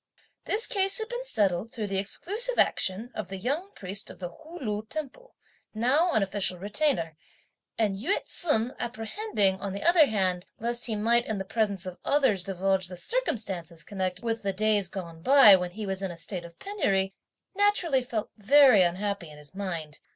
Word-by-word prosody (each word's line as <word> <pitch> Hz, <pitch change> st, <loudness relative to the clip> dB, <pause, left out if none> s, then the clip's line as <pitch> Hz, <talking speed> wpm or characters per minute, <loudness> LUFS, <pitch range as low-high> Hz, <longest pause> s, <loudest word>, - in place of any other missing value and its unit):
This 435 Hz, +3 st, 0 dB
case 390 Hz, -4 st, +2 dB
had 440 Hz, 0 st, -3 dB
been -, -, -4 dB
settled 205 Hz, -, 0 dB
through 220 Hz, -4 st, -4 dB
the 195 Hz, -1 st, -1 dB
exclusive 430 Hz, -, -2 dB
action 210 Hz, +6 st, +1 dB
of 215 Hz, -4 st, -5 dB
the 195 Hz, -, -6 dB
young 285 Hz, -, -2 dB
priest 195 Hz, +2 st, -5 dB
of -, -, -10 dB
the 175 Hz, -2 st, -5 dB
Hu 315 Hz, -, -12 dB
Lu 210 Hz, -4 st, -3 dB
temple, 315 Hz, -, -6 dB, 0.4 s
now 280 Hz, +10 st, +2 dB
an 215 Hz, -, +3 dB
official 195 Hz, -2 st, -1 dB
Retainer; 200 Hz, -, 0 dB, 0.6 s
and 215 Hz, -3 st, +1 dB
Yü 245 Hz, -, 0 dB
ts'un, 250 Hz, -8 st, 0 dB
apprehending, 225 Hz, -, -1 dB
on 200 Hz, -2 st, -3 dB
the 200 Hz, -, -5 dB
other 340 Hz, -3 st, +6 dB
hand, 185 Hz, -4 st, 0 dB
lest 240 Hz, +2 st, -1 dB
he 220 Hz, -, -1 dB
might 235 Hz, +3 st, +2 dB
in 220 Hz, -, -2 dB
the 195 Hz, -, -4 dB
presence 200 Hz, -3 st, -1 dB
of 185 Hz, 0 st, -7 dB
others, 265 Hz, -11 st, +2 dB
divulge 190 Hz, 0 st, 0 dB
the 180 Hz, 0 st, -8 dB
circumstances 185 Hz, -, -2 dB
connected 185 Hz, 0 st, -4 dB
with 225 Hz, 0 st, -1 dB
the 195 Hz, -1 st, -1 dB
days 210 Hz, -1 st, +2 dB
gone 170 Hz, -3 st, -7 dB
by, 260 Hz, -2 st, +8 dB
when 180 Hz, -1 st, -1 dB
he 210 Hz, +4 st, -6 dB
was 190 Hz, -1 st, -3 dB
in 195 Hz, -, -2 dB
a 170 Hz, -, -8 dB
state 180 Hz, -1 st, -5 dB
of 170 Hz, 0 st, -13 dB
penury, 195 Hz, -, 0 dB, 0.4 s
naturally 380 Hz, -9 st, +2 dB
felt 235 Hz, -4 st, -4 dB
very 255 Hz, 0 st, +6 dB
unhappy 185 Hz, 0 st, -1 dB
in 150 Hz, -, -13 dB
his 150 Hz, +2 st, -12 dB
mind. 170 Hz, -6 st, -5 dB
210 Hz, 185 wpm, -27 LUFS, 190-270 Hz, 0.6 s, by